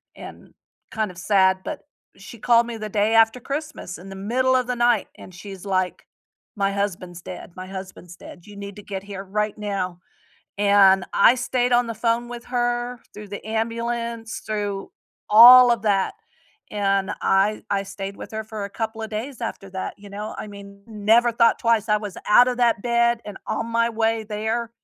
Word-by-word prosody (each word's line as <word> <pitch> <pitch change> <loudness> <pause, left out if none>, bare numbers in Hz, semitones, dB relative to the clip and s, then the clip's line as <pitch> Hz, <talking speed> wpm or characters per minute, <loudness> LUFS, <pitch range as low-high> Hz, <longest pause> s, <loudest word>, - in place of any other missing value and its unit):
and - - -12 0.4
kind 220 -4 -2
of 175 - -16
sad, 190 0 +3
but, 305 - -5 0.4
she 200 +3 -12
called 235 0 +4
me 235 -1 -6
the 215 0 -5
day 210 +2 +1
after 225 +2 +4
Christmas 285 - -5
in 185 +3 -12
the 195 - -8
middle 255 +6 +1
of 250 -1 +1
the 250 - -1
night 240 -3 +2
and 185 - -13
she's 195 0 -10
like, 185 -2 -1 0.5
"My 200 -1 0
husband's 180 -3 -4
dead. 180 - -9
My 185 0 -7
husband's 185 -2 -9
dead. 175 +2 -13
You 205 - -12
need 200 0 -8
to - - -8
get 195 -2 -6
here 200 -1 -7
right 210 +2 -2
now," 195 -4 -3 0.6
and 195 -2 +5
I 230 +5 +6
stayed 250 0 -1
on 240 -1 +3
the 230 - -4
phone 235 +1 0
with 240 0 -8
her, 240 0 -2
through 210 -1 -10
the 200 - -7
ambulance, 230 0 -3
through 205 -2 -3 0.4
all 245 +3 +9
of 225 -3 -2
that, 200 -3 +1 0.6
and 195 -1 0
I 200 +2 +2
I 200 -1 +1
stayed 195 0 -7
with - - -9
her 220 0 -4
for 215 -2 -7
a 200 - -7
couple 225 0 -4
of 220 - -6
days 240 +4 -5
after 195 -4 -5
that, 190 0 -5
you 205 0 -13
know, 210 +2 -6
I - - -5
mean, 200 -1 -12
never 225 +2 +3
thought 230 0 +3
twice, 230 -2 +1
I 210 - +4
was 205 -3 -7
out 245 +4 +7
of 250 0 -2
that 235 -4 +2
bed 235 -1 +2
and 205 -2 -8
on 230 - -2
my 230 0 +1
way 225 0 0
there. 220 +2 -3
215 Hz, 195 wpm, -23 LUFS, 200-235 Hz, 0.6 s, all